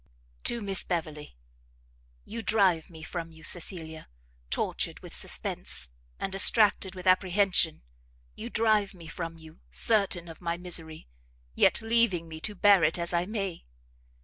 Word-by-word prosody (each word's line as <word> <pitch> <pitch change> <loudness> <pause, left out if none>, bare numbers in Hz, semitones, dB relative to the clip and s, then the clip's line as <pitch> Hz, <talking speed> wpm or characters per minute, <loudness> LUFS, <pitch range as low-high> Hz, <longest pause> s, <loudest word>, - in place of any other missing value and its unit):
To 235 - 0
Miss 195 -2 -1
Beverley. 155 - -5 0.9
You 230 +1 -6
drive 195 -8 +2
me 160 -2 -12
from 165 0 -6
you, 160 0 -16
Cecilia, 160 -1 +1 0.4
tortured - - -1
with - - -11
suspense, 60 - 0 0.3
and 195 - -3
distracted 195 -1 +4
with 185 0 -9
apprehension, 185 - +2 0.5
you 230 - -7
drive 215 -4 +2
me 170 -2 -13
from 165 +1 -6
you, 160 0 -15
certain 200 -6 +1
of 165 +1 -11
my 170 -1 -2
misery, 165 - -3 0.5
yet - - +2
leaving 225 -7 +2
me 160 -1 -8
to 210 +5 -3
bear 200 -2 +5
it 160 - +2
as 170 0 -4
I 175 +1 0
may! 195 -5 -4
180 Hz, 145 wpm, -28 LUFS, 165-200 Hz, 0.9 s, bear